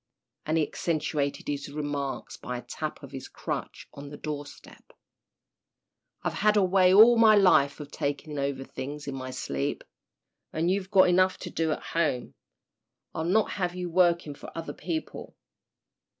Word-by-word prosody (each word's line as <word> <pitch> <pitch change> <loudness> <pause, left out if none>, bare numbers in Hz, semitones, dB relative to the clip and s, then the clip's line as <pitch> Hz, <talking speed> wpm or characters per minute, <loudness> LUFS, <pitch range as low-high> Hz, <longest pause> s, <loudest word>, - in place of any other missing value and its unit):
and 155 +1 +1
he 155 - +2
accentuated 150 -3 -2
his 145 0 -3
remarks 145 -2 -4
by 125 - -5
a 120 - -8
tap 155 -1 -5
of 140 - -10
his 130 -1 -7
crutch - - -5
on 140 0 -9
the 145 - -9
door 145 -1 -5
step. - - -16 1.3
"I've - - -1
had 210 0 +4
a 200 - +5
way 185 0 +4
all 225 +4 +8
my 220 -1 +7
life 180 -9 +4
of 145 -1 -8
talking 145 +1 -3
over 140 -1 -2
things 140 +3 -7
in 140 - -3
my 130 -1 -5
sleep. 70 - -3 0.7
And 165 +3 0
you've 190 0 -1
got 190 -2 +6
enough 185 +1 +3
to - - -6
do 160 -1 0
at - - -3
home. 150 -7 -1 0.8
I'll 160 - -3
not 205 +5 +2
have 180 -3 -2
you 180 -1 -4
working 170 -3 +3
for - - -10
other 165 - -5
people." 320 -1 -5
155 Hz, 165 wpm, -28 LUFS, 140-185 Hz, 1.3 s, all